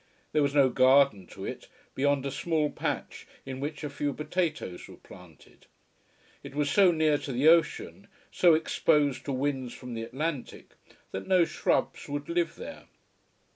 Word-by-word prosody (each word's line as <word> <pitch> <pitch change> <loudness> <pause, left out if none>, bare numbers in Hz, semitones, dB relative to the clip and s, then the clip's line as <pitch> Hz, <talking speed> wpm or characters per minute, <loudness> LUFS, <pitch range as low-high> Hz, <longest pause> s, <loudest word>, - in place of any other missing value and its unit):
There 150 - +2
was 140 0 0
no 140 -2 +5
garden 130 -7 +4
to - - -9
it, - - -7 0.3
beyond 140 0 +1
a 140 - -2
small 155 +1 0
patch - - -4 0.2
in 130 0 -6
which 150 +3 -5
a - - -2
few 145 0 -2
potatoes 155 - -3
were - - -13
planted. 90 -5 -17 0.7
It - - -11
was 145 -1 0
so 195 -3 +6
near 155 -3 +2
to 140 - -6
the 130 +4 +2
ocean, 170 +4 +2 0.2
so 175 -3 +5
exposed 150 -3 +1
to 140 - -3
winds 130 -2 -2
from 125 -1 -8
the 115 - -4
Atlantic, 135 +3 -5 0.4
that 95 0 -6
no 180 -2 +4
shrubs - - -1
would 145 +1 -4
live 170 -1 0
there. 285 - -9
145 Hz, 165 wpm, -28 LUFS, 130-160 Hz, 0.7 s, so